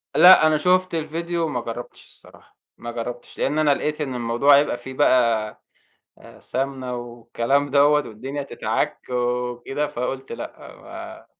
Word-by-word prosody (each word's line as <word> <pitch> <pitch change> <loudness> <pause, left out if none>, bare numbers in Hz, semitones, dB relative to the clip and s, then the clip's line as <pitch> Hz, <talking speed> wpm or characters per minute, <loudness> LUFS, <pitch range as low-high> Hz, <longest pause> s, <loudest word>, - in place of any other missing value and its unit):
لأ 180 -3 +8
أنا 155 -1 +3
شُفت 185 +2 +2
الفيديو 165 +2 -2
وما 130 -6 -2
جرَّبتش 115 +1 -8
الصراحة، - - -19 0.2
ما 120 - -7
جرَّبتش، 120 +1 -7
لإن 150 +3 0
أنا 150 -2 +4
لقيت 150 +2 -3
إن 135 -4 -3
الموضوع 120 +4 +4
هيبقى 145 -3 +1
فيه 130 +2 -9
بقى 115 -6 +2 0.6
آآ، - - -16
سَمنَة 130 -1 -3
والكلام 120 +3 -2
دوَّة 140 +1 +5 0.2
والدنيا 135 +6 -6
تتعك 140 - -2
وكده، 125 +3 -2
فقُلت 130 +2 -5
لأ - - -7 0.3
ما - - -10
135 Hz, 140 wpm, -22 LUFS, 120-150 Hz, 0.6 s, لأ